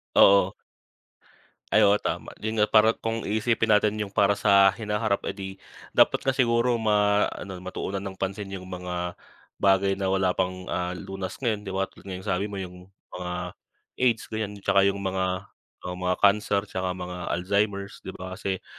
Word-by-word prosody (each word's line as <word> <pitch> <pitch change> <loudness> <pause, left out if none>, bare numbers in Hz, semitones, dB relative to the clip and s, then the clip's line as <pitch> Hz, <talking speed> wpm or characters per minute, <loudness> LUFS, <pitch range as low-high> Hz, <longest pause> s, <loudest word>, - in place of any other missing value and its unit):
Oo. 100 -1 +6 1.1
Ay, 105 - +4
oo, 100 0 +5
tama. - - -3
Yun 110 0 0
nga, - - +5
para 110 +1 +6
kung 115 0 -3
iisipin 110 +2 +1
natin 105 0 +1
yung 100 -2 -4
para 100 0 +3
sa 100 -1 +6
hinaharap, 105 0 -1
eh, 95 - -3
'di 95 -1 -6 0.4
dapat - - +4
nga 135 - +3
siguro 120 -2 +2
maano, 105 -3 +1
matuunan 95 +2 -4
ng 95 -1 -6
pansin 95 +2 -3
yung 95 - -8
mga 90 -1 -4 0.4
bagay 95 0 +3
na 95 - 0
wala 95 -1 +2
pang, 95 0 -2
ah, 90 0 -2
lunas 95 +1 -6
ngayon, 110 -4 -1
'di - - -3
ba 95 - +1
tulad - - -18
nga 95 - -4
ng 100 - -5
sabi 100 +2 0
mo 100 - -7
yung 90 -1 -7 0.2
mga 90 -1 -5 0.7
AIDS 120 -4 +1
ganiyan, 105 -2 -3
tsaka 100 0 +4
yung 100 0 -1
mga, 95 0 -1 0.4
ah, 90 0 -4
mga 90 0 0
cancer 100 0 +4
tsaka 95 -3 -3
mga 90 -1 -6 0.2
Alzheimer's 100 +2 -1
'di 95 - -9
ba 95 0 -7
kasi, 95 -2 -3
100 Hz, 175 wpm, -26 LUFS, 95-105 Hz, 1.1 s, Oo